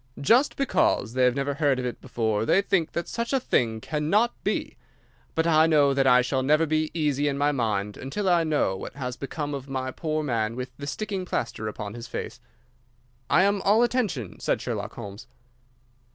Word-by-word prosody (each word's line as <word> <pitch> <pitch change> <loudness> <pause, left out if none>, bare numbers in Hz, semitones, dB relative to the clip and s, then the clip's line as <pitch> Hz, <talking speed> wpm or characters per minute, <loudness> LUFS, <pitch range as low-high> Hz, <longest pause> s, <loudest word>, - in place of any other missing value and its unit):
"Just 235 - +3
because 120 - +1
they 130 0 +3
have 125 0 +3
never 140 +1 -1
heard 140 -2 +1
of 130 - -3
it 125 - -5
before, 110 -2 -1
they 190 - +3
think 185 -6 0
that 170 - -3
such 235 +3 -3
a 270 - +3
thing 115 - 0
cannot 160 - +1
be. - - -2 0.6
But 160 - +1
I 160 -1 +5
know 145 -3 +4
that 135 -1 +2
I 125 0 +6
shall 130 +1 0
never 150 +4 +3
be 155 0 0
easy 145 -3 +1
in 140 -1 -1
my 145 +1 +2
mind 105 -6 -1
until 155 +10 -3
I 175 -2 +4
know 150 -11 +1
what 95 - -8
has 125 -3 -4
become 145 +2 -4
of 140 -1 -6
my 130 -1 -3
poor 155 +1 -2
man 115 -5 -1
with 125 0 -6
the 140 - -7
sticking 195 +4 -3
plaster 115 -10 -3
upon 105 -1 -5
his 120 0 -8
face." - - -6 0.9
"I 180 - +5
am 200 0 +2
all 215 +4 +4
attention," 200 - -1
said - - 0
Sherlock - - -4
Holmes. 105 +4 -9
140 Hz, 195 wpm, -26 LUFS, 125-165 Hz, 0.9 s, I